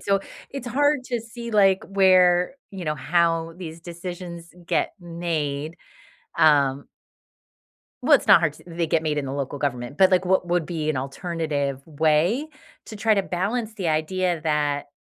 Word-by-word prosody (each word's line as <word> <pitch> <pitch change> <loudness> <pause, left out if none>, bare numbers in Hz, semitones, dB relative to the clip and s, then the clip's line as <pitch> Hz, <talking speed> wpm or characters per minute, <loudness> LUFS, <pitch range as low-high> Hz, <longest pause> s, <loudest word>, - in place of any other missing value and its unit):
So 195 -1 +1 0.3
it's 270 -3 -7
hard 285 +2 +1
to 240 -2 -2
see, 235 +1 -8
like, 195 -3 +4
where, 185 0 +4 0.2
you 190 -3 -7
know, 150 - 0
how 165 +2 +1
these 165 -2 -8
decisions 175 0 -8
get - - 0
made. 165 -3 -3 0.6
Um 145 -3 +4 1.2
Well, - - +1
it's - - -2
not - - +8
hard - - +2
to - - -17
They 170 0 -2
get 160 0 +1
made 155 -2 -1
in 145 - -1
the 135 - -4
local 140 0 -4
government, 135 -1 -3
but, 190 0 +5
like, 185 0 +3
what 185 0 +2
would 175 -2 0
be 155 -3 -3
an 145 - 0
alternative 140 -1 -3
way 160 - +1 0.4
to 215 - -8
try 220 +1 +3
to 195 -2 +1
balance 215 +5 -2
the 190 -5 -3
idea 170 +2 0
that, 150 -2 0
170 Hz, 170 wpm, -24 LUFS, 150-190 Hz, 1.2 s, not